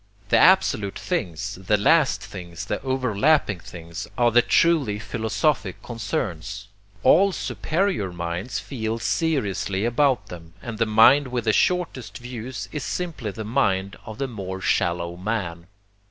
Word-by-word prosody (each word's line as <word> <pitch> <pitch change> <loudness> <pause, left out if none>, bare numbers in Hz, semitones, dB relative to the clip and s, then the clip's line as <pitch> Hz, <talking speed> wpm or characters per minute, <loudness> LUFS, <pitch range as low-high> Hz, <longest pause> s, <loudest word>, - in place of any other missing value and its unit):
The - - +5
absolute 105 - +4
things, 85 +1 -3
the 105 +3 +3
last 120 - +3
things, 90 -5 -8
the - - -3
overlapping 130 - +1
things, 85 +1 -8
are 120 -1 +4
the 120 +2 +6
truly 145 -9 +3
philosophic 110 - -1
concerns; 105 -4 -4 0.3
all 195 +9 +6
superior 175 - -1
minds 85 +6 -4
feel 115 -4 -3
seriously 110 - -1
about 130 +2 +2
them, 85 -1 -11
and 115 -2 -7
the 115 - +2
mind 115 +6 +6
with 125 -2 -2
the 110 -1 +2
shortest 175 -9 0
views 125 0 -6
is 150 - -4
simply 165 -11 -3
the 110 +2 -6
mind 100 -5 0
of 110 -1 -9
the 135 - -2
more 95 -6 -6
shallow 85 -2 0
man. 90 -4 -3
110 Hz, 140 wpm, -24 LUFS, 95-130 Hz, 0.3 s, the